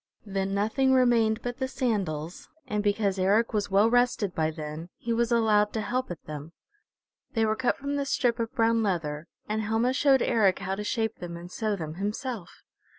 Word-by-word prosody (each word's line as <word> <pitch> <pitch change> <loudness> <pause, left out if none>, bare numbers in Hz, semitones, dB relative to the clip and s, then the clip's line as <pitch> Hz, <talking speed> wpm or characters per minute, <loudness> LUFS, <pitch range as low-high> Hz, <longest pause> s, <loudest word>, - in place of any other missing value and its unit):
Then 195 -1 -2
nothing 265 +6 +2
remained 235 -3 +3
but 245 0 -4
the 260 - 0
sandals, 195 - -2 0.2
and 210 0 -1
because 205 -2 +1
Eric 205 +6 +2
was 205 -2 0
well 200 +3 +4
rested 240 -5 +2
by 155 -1 +1
then, 155 +1 -6
he 235 - -2
was 235 +1 +1
allowed 215 -3 +3
to 220 - -1
help 255 +4 -2
at 175 -3 -7
them. 155 +2 -7 0.8
They 225 -3 +2
were 215 0 +1
cut 250 +1 0
from 280 +1 -3
the 280 - -1
strip 245 -3 +1
of 230 -1 -2
brown 230 0 +3
leather, 165 -6 -2 0.2
and 215 +1 -1
Helma 225 +4 +1
showed 270 -1 +4
Eric 205 -6 +3
how 190 -1 -3
to 205 +2 -3
shape 220 0 -1
them 170 -1 -6
and 175 +1 -10
sew 215 0 -1
them 160 -5 -5
himself. 210 -1 -4
215 Hz, 195 wpm, -27 LUFS, 190-235 Hz, 0.8 s, well